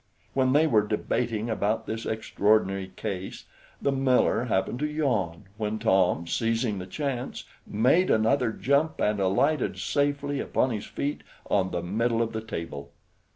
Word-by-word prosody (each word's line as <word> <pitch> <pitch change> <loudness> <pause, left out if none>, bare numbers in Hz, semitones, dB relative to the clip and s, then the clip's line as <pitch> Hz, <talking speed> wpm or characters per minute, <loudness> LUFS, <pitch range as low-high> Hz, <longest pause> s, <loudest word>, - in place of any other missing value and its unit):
When 130 -1 +2
they 150 +3 +5
were 115 -9 +4
debating 105 +1 -1
about 110 0 0
this 110 +1 -4
extraordinary 100 -3 +1
case, 95 -1 -5 0.3
the 140 - +1
miller 130 -2 +2
happened 110 +1 0
to 150 - 0
yawn, 120 - -1
when 110 0 -2
Tom, 95 -6 +2
seizing 115 +1 0
the 90 - -7
chance, 135 +2 -3 0.2
made 130 - +3
another 115 +2 +3
jump, 140 +7 +1
and 105 -1 +1
alighted 125 +10 +1
safely 145 0 0
upon 130 - 0
his 105 -3 -4
feet 145 +1 -3 0.3
on 95 -2 +2
the 85 -2 -3
middle 115 +5 +1
of 115 - -4
the 110 - -3
table. 85 -9 -6
110 Hz, 150 wpm, -27 LUFS, 100-135 Hz, 0.3 s, they